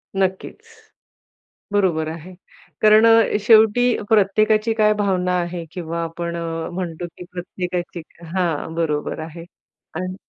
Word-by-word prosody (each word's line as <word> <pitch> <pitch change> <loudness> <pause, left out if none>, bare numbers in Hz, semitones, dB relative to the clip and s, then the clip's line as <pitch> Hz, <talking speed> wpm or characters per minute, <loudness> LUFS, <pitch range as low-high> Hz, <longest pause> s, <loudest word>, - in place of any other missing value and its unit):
नक्कीच. 190 -1 -2 1.1
बरोबर 175 -6 +1
आहे. 165 +3 -9 0.5
कारण 215 +1 +6
अ, 225 -2 +5
शेवटी 220 +2 +5 0.2
प्रत्येकाची 215 +2 +3
काय 215 -1 +3
भावना 190 -3 0
आहे 175 0 -5
किंवा 170 -1 -4
आपण 170 +1 -5
अ, 165 -1 -4
म्हणतो 175 -2 -4
की - - -8
प्रत्येकाची 175 -1 -5 0.3
हा 185 -1 +2 0.3
बरोबर 155 -3 -2
आहे. 165 +1 -8 0.5
आणि 185 +2 -4
180 Hz, 115 wpm, -21 LUFS, 170-210 Hz, 1.1 s, कारण